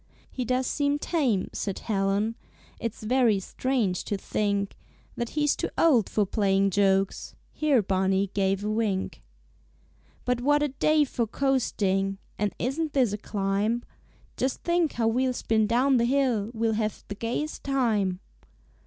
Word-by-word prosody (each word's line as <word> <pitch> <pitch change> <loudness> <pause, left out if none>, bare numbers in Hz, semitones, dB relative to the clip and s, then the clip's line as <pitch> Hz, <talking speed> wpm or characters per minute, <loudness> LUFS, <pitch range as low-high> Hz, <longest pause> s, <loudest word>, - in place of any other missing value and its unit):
"He 255 - -3
does 255 +2 0
seem 285 +2 +1
tame," 275 - 0
said 195 -2 -3
Helen, 200 +1 0 0.5
"It's 230 -1 -5
very 235 -3 +3
strange 215 -2 -1
to 205 - -2
think 200 0 -1 0.4
That 235 -1 -3
he's 295 -1 +3
too - - -2
old 260 - +4
for 210 - +1
playing 195 -1 +2
jokes." 195 0 +1 0.2
(Here 285 -7 +2
Barney 190 +1 +1
gave 195 0 0
a 210 - -1
wink.) 215 -4 -1 1.0
"But 250 -1 0
what 290 +3 +3
a 295 - +1
day 305 +3 +3
for 240 -4 -2
coasting! 200 -7 0 0.2
And 205 -1 +1
isn't 295 +5 -2
this 250 -7 +2
a - - -1
climb? 205 +3 -1 0.5
Just 260 0 -1
think 340 -2 +1
how 230 -1 0
we'll 255 +3 +1
spin 220 -3 +1
down 255 +4 +3
the 235 - +2
hill 245 -5 +1
We'll 225 -1 0
have 215 -1 -2
the - - -4
gayest 235 +8 -3
time." 215 -9 0
225 Hz, 150 wpm, -27 LUFS, 200-260 Hz, 1.0 s, old